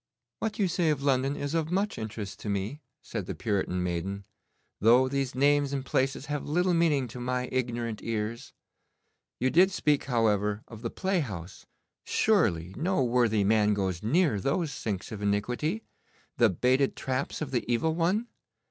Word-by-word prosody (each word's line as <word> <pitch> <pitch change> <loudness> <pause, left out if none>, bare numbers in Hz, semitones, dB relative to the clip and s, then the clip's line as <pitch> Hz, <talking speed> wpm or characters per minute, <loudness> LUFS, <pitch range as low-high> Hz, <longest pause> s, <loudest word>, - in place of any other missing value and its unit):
'What 220 -2 -2
you 200 - +2
say 175 -2 +1
of 145 -2 0
London 135 0 +2
is 145 +1 -3
of 160 -1 0
much 195 - 0
interest 110 -2 -6
to 105 - -5
me,' 100 +9 -2 0.2
said 105 -6 -5
the - - -4
Puritan 95 -4 -1
maiden, 90 +3 -3 0.5
'though 120 +5 +5
these 135 -1 -2
names 140 +1 +3
and 135 -1 -2
places 135 +1 0
have 145 -1 -4
little 180 +4 +2
meaning 155 -6 +2
to 125 - -8
my 125 +1 -1
ignorant 120 -3 -2
ears. 115 +1 -3 0.9
You 130 +1 +1
did 185 +3 +6
speak, 150 -6 +1
however, 105 -4 +1
of 110 -2 -11
the 115 - -2
playhouse. 115 - -3 0.4
Surely 95 - +2
no 170 0 +1
worthy 120 -4 +2
man 105 0 +3
goes 95 -4 -1
near 145 - +2
those 145 - 0
sinks 105 -8 -4
of 105 -2 -6
iniquity, 125 - -1 0.5
the 120 -2 +5
baited 130 +8 +2
traps 130 +1 -2
of 150 -4 -4
the 125 -3 0
Evil 160 +7 +2
One? 180 +7 +1
125 Hz, 165 wpm, -28 LUFS, 105-150 Hz, 0.9 s, did